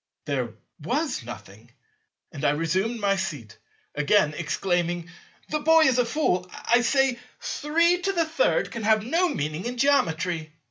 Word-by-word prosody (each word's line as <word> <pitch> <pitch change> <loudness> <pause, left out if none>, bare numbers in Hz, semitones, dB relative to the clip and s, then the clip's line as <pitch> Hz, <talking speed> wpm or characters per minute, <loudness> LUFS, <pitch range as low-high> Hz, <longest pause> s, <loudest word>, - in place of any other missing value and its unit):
There 125 -6 -2 0.3
was 275 - -1
nothing; 110 -1 -11 0.6
and 140 - -8
I - - +4
resumed 185 +9 -1
my 200 -1 +1
seat, 145 - -5 0.3
again 150 +2 +2
exclaiming, 175 +1 -1 0.4
"The 305 - -1
boy 320 +2 +5
is 260 -4 +3
a 245 - +3
fool, 205 - 0 0.2
I 240 +1 +4
say; 270 0 +2 0.2
33 340 +8 +1
can 230 - -5
have 215 0 +2
no 340 +8 +2
meaning 155 - -3
in 245 +1 -4
Geometry." 170 - +1
205 Hz, 135 wpm, -25 LUFS, -, 0.6 s, boy